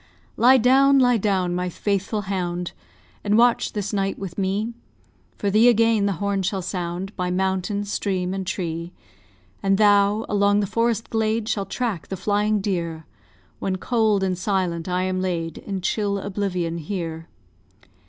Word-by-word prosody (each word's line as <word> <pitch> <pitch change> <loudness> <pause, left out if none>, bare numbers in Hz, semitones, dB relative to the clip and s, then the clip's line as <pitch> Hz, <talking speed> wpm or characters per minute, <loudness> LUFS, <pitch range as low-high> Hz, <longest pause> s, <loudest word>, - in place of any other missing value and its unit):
Lie 255 +3 +6
down, 270 +3 +5
lie 245 -2 +4
down, 190 -4 0
my 180 0 -1
faithful 200 +3 -1
hound! 180 -3 -3 0.5
And 210 +1 +2
watch 240 0 +3
this 205 0 -3
night 195 -1 -1
with 185 -3 -6
me. 200 +4 -1 0.6
For 200 - -1
thee 220 +4 +5
again 225 -3 +3
the 200 - +1
horn 200 +1 -1
shall 190 0 -2
sound, 180 +2 -4
By 180 -1 -2
mountain, 190 +2 -1
stream, 190 -2 -2
and 190 -1 -4
tree; 170 -1 -4 0.7
And 195 0 +2
thou, 205 +1 +4
along 205 0 +3
the 205 - +1
forest 230 +2 -1
glade, 220 0 0
Shall 200 -3 -1
track 225 -10 -3
the 190 - -5
flying 205 +2 +1
deer 170 -5 -3 0.5
When, 190 -1 -1
cold 215 -1 +1
and 185 -1 0
silent, 180 -3 -1
I 180 0 0
am 185 0 -1
laid 165 -3 -3
In 195 -2 -5
chill 200 +1 0
oblivion 185 -4 -2
here. 165 -1 -5
195 Hz, 155 wpm, -23 LUFS, 180-210 Hz, 0.7 s, Lie